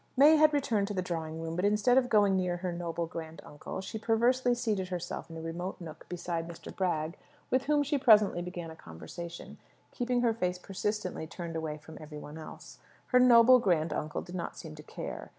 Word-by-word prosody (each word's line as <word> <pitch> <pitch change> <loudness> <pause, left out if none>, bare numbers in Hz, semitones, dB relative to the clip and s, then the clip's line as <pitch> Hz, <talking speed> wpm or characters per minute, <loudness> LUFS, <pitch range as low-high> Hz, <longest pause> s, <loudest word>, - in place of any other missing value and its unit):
May 300 +4 +8
had 305 0 +6
returned 245 -9 +1
to 205 - -4
the 185 - -1
drawing 160 -2 -4
room; 165 0 -4
but 180 - -1
instead 210 +4 +3
of 255 -1 +3
going 205 -2 +4
near 180 -1 0
her 180 0 -3
noble 170 -1 -3
grand 165 -1 -7
uncle, 150 +5 -7
she 220 +3 -6
perversely 240 +3 +2
seated 215 -6 -1
herself 180 -2 -5
in 165 - -8
a - - -6
remote 170 +3 -5
nook 165 -3 -10
beside 170 -1 -3
Mr. 170 -1 -9
Bragg, 165 -3 -1 0.3
with 260 +1 +2
whom 295 0 +3
she 290 0 0
presently 210 -7 +5
began 175 -2 -6
a - - -10
conversation, 125 - -9 0.3
keeping 245 -1 0
her 235 -2 +3
face 180 -5 -1
persistently 195 -2 -3
turned 165 0 -7
away 160 -2 -3
from 160 +1 -12
every 150 -1 -9
one 150 +1 -9
else. 155 - -11 0.3
Her 250 - +5
noble 250 0 +8
grand 170 -7 +1
uncle 155 -1 -3
did 180 - -11
not 175 -2 -4
seem 160 -2 -8
to 155 - -10
care. - - -7
180 Hz, 205 wpm, -30 LUFS, 165-230 Hz, 0.3 s, May